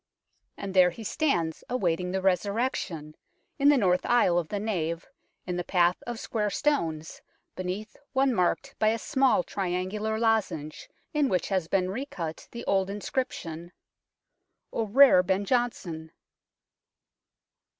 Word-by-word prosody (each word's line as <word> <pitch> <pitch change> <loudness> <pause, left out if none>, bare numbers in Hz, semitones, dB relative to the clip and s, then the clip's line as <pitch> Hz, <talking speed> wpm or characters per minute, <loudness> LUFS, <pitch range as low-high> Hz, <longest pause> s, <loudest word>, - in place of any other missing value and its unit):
And 195 -1 -5
there 185 -2 +6
he 200 +6 -9
stands 175 - 0
awaiting 180 -7 0
the 190 0 -2
Resurrection, 190 -5 -1 0.5
in 280 +1 +6
the 290 - +6
north 185 -5 +2
aisle 185 -8 +3
of 165 - -4
the 205 - -3
nave, 170 -6 -2 0.4
in 180 -1 -3
the 175 - -2
path 175 0 +2
of 240 -2 -4
square 210 -2 -1
stones, 165 - -1 0.3
beneath 185 +4 -5 0.2
one 270 -1 +2
marked 180 -5 0
by 215 - +3
a 220 +1 +3
small 270 +2 +2
triangular 195 +3 -2
lozenge, 200 -10 -1 0.2
in 295 -3 +2
which 180 -5 0
has 190 -4 0
been 185 +1 +1
recut 190 - -5
the 235 0 -8
old 195 -1 +1
inscription 180 -6 -4 0.5
" - - -45
O 225 - -1
rare 255 -3 +7
Ben 190 +2 0
Johnson 190 -10 -1
195 Hz, 140 wpm, -27 LUFS, 175-230 Hz, 0.5 s, rare